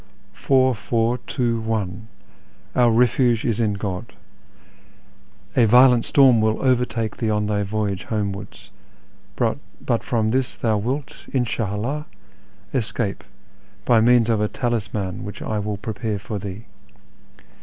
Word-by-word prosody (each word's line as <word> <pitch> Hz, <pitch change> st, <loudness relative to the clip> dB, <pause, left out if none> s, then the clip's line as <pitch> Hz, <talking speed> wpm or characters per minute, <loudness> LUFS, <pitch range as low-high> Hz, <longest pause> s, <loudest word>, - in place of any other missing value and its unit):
" 100 Hz, 0 st, -32 dB
Four, 130 Hz, -1 st, +4 dB
four, 115 Hz, +2 st, 0 dB
two, 120 Hz, -2 st, -1 dB
one; 110 Hz, -2 st, -3 dB, 0.7 s
our 120 Hz, -1 st, +5 dB
refuge 120 Hz, 0 st, +3 dB
is 115 Hz, -3 st, 0 dB
in 110 Hz, -3 st, +1 dB
God! 100 Hz, -2 st, -5 dB, 1.4 s
A 120 Hz, -, +5 dB
violent 125 Hz, +1 st, +6 dB
storm 130 Hz, -5 st, +5 dB
will 110 Hz, 0 st, +1 dB
overtake 125 Hz, -4 st, 0 dB
thee 115 Hz, -, -1 dB
on 105 Hz, -1 st, +1 dB
thy 105 Hz, 0 st, 0 dB
voyage 100 Hz, -1 st, -2 dB
homewards, 100 Hz, -1 st, -4 dB, 0.6 s
but 120 Hz, 0 st, -2 dB
from 110 Hz, -3 st, 0 dB
this 130 Hz, +2 st, 0 dB
thou 110 Hz, -3 st, 0 dB
wilt, 130 Hz, +7 st, -4 dB
In 130 Hz, -2 st, +1 dB
slia 105 Hz, -3 st, -2 dB
'lldh, 140 Hz, +8 st, -3 dB, 0.7 s
escape, 110 Hz, -4 st, -2 dB, 0.6 s
by 115 Hz, -2 st, +5 dB
means 120 Hz, 0 st, +4 dB
of 110 Hz, -2 st, +1 dB
a 105 Hz, -, +2 dB
talisman 105 Hz, -5 st, -3 dB
which 100 Hz, -, -7 dB
I 110 Hz, -, -2 dB
will 105 Hz, 0 st, -3 dB
prepare 110 Hz, 0 st, -3 dB
for 105 Hz, +1 st, -5 dB
thee. 100 Hz, +3 st, -7 dB
110 Hz, 135 wpm, -22 LUFS, 105-120 Hz, 1.4 s, violent